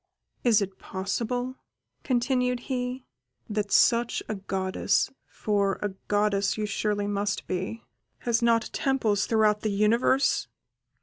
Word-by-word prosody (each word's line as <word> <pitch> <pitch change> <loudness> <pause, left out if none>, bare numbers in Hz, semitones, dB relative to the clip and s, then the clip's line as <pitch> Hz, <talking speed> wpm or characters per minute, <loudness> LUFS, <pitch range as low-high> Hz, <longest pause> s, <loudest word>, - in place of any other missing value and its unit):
Is 220 -4 +4
it 190 -1 -8
possible," 245 +6 -3 0.5
continued 250 -1 +1
he, 250 0 -3 0.4
"that 210 -2 -2
such 235 0 +3
a - - -2
goddess 190 -1 0 0.2
(for 200 -2 0
a 205 - 0 0.2
goddess 205 -1 +1
you 215 - -1
surely 205 0 -1
must 205 0 -1
be) 185 +5 -4 0.4
has 235 0 +1
not 235 -1 +2
temples 225 -7 +1
throughout 215 -2 +3
the 215 - 0
universe?" 225 +6 +2
215 Hz, 120 wpm, -27 LUFS, 200-245 Hz, 0.5 s, Is